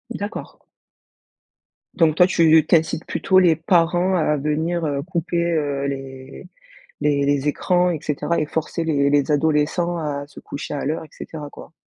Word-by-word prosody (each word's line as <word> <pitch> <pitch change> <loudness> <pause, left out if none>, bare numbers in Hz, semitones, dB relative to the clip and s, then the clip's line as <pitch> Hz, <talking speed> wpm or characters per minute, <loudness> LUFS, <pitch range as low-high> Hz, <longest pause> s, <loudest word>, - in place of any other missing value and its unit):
D'accord. 205 +1 -6 1.4
Donc 160 -3 +3
toi 180 +1 +5
tu 160 -3 +4
tu - - +5
incites 160 0 0
plutôt 185 -1 +2
les 170 -3 +4
parents 175 +2 +2
à 150 -3 +1
venir, 160 +4 -1
heu, 140 -2 -1
couper, 170 -1 -1
heu, 145 -3 -1
les 135 -1 -8 0.5
les 140 -1 +1
les 145 0 +1
écrans 180 +4 +1
et 160 - -3
cetera? 150 +3 -1
Et 150 - -1
forcer 160 +2 -3
les 140 -3 +1
les 145 +1 +2
adolescents 160 +3 +1
à 145 -2 -4
se - - -13
coucher 140 - -7
à 140 - -3
l'heure 155 +3 -2
et - - -15
cetera 150 -2 -8
quoi? 165 - -13
155 Hz, 165 wpm, -21 LUFS, 145-170 Hz, 1.4 s, toi